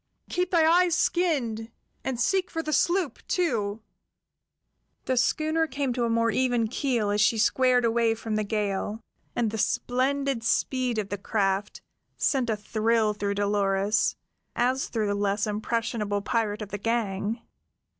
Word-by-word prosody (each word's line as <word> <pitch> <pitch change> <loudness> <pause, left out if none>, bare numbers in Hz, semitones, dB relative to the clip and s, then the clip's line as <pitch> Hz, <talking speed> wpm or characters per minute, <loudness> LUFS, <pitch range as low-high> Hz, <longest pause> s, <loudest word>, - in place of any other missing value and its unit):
"Keep 360 0 0
thy 330 -3 +4
eyes 350 +1 +4
skinned, 260 -12 0 0.3
and 260 -3 -3
seek 375 +8 +1
for 325 -1 -3
the 305 - -2
sloop, 345 -3 +1
too." 220 - -1 1.2
The 260 - 0
schooner 315 +6 +1
came 275 -4 -2
to 240 -1 0
a - - 0
more 230 0 +2
even 245 -2 +1
keel 235 -5 0
as 205 0 +1
she 225 +2 +3
squared 250 +2 +3
away 230 0 +2
from 220 -1 -4
the 215 - +1
gale, 205 0 -2 0.4
and 230 -3 0
the 220 - -4
splendid 265 +2 0
speed 250 0 0
of 205 -2 -2
the 205 - -4
craft 195 -1 -1 0.4
sent 260 -4 +1
a 220 - 0
thrill 220 +1 +1
through 200 -1 -2
Dolores, 200 0 +1 0.4
as 255 +3 +1
through 220 -3 -1
the 205 - 0
less 200 +1 0
impressionable 210 -1 -2
pirate 215 -1 -1
of 205 - -9
the 205 - -5
gang. 225 0 -1
230 Hz, 155 wpm, -26 LUFS, 210-260 Hz, 1.2 s, thy